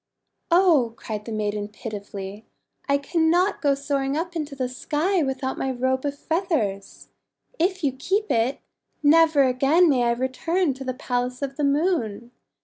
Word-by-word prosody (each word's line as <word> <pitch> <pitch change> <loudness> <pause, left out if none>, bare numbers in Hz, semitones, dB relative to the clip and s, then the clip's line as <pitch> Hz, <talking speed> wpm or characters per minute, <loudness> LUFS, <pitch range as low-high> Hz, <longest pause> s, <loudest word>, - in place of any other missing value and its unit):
"Oh!* 330 -10 +4
cried 210 -1 -6
the 230 - -6
maiden 210 -1 -2
pitifully, 205 -2 -7 0.5
"I 280 - +4
cannot 335 +6 +1
go 285 -2 +3
soaring 275 0 -1
up 345 +2 -3
into 300 -3 -4
the 260 -2 -1
sky 310 +8 0
without 265 -2 -2
my 265 - -1
Robe 260 +1 -1
of 285 0 -2
Feathers. 295 - -2 0.5
If 370 +1 0
you 280 - +2
keep 385 +11 -1
it, 235 +4 +1 0.4
never 315 -1 +5
again 275 +7 +4
may 250 -3 +2
I 235 - +3
return 275 +7 0
to 265 +1 -8
the 255 -1 -3
Palace 250 0 -2
of 275 -1 -3
the 295 - -2
Moon. 280 - 0
275 Hz, 155 wpm, -24 LUFS, 245-320 Hz, 0.5 s, never